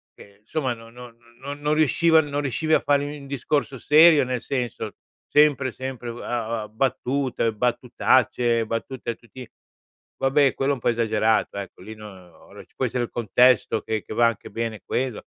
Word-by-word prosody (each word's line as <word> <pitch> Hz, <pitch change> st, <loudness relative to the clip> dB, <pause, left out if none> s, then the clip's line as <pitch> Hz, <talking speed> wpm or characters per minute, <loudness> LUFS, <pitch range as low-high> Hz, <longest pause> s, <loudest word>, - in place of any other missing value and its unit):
che, 100 Hz, 0 st, -16 dB
insomma, 130 Hz, +3 st, -2 dB
no 115 Hz, -1 st, -13 dB
no 120 Hz, 0 st, -12 dB, 0.2 s
non 140 Hz, +2 st, -7 dB
non 150 Hz, +1 st, +1 dB
riusciva 160 Hz, +2 st, +4 dB
non 145 Hz, -1 st, -3 dB
riuscivi 150 Hz, +3 st, -1 dB
a -, -, +6 dB
fare 145 Hz, 0 st, +1 dB
un 140 Hz, -, -12 dB
discorso 140 Hz, 0 st, -2 dB
serio. 155 Hz, 0 st, +6 dB
Nel 125 Hz, -1 st, -3 dB
senso, 125 Hz, -5 st, -4 dB, 0.3 s
sempre, 145 Hz, -3 st, +3 dB
sempre, 130 Hz, -1 st, -6 dB
uhm, 120 Hz, -, -9 dB
a 115 Hz, -2 st, -3 dB
a -, -, -9 dB
battute, 125 Hz, 0 st, -1 dB
battutacce, 120 Hz, 0 st, +1 dB
battute 115 Hz, +2 st, -4 dB
a -, -, -7 dB
tutti 120 Hz, +1 st, -13 dB, 0.7 s
vabbè, 135 Hz, 0 st, +3 dB
quello 135 Hz, +1 st, 0 dB
è -, -, -1 dB
un 125 Hz, -, -12 dB
po' -, -, +1 dB
esagerato, 110 Hz, -2 st, +1 dB
ecco. 100 Hz, -2 st, -8 dB
Lì 110 Hz, +3 st, -9 dB
no 105 Hz, 0 st, -10 dB
uhm, 90 Hz, -3 st, -16 dB, 0.2 s
ora -, -, -12 dB
ci -, -, -36 dB
può -, -, -1 dB
essere 125 Hz, -, -1 dB
il -, -, -13 dB
contesto 120 Hz, +2 st, +3 dB
che 110 Hz, -2 st, -3 dB
che -, -, -8 dB
va 120 Hz, +2 st, +3 dB
anche 115 Hz, -3 st, -4 dB
bene 115 Hz, 0 st, -4 dB
quello. 125 Hz, -4 st, -2 dB
125 Hz, 185 wpm, -24 LUFS, 115-140 Hz, 0.7 s, a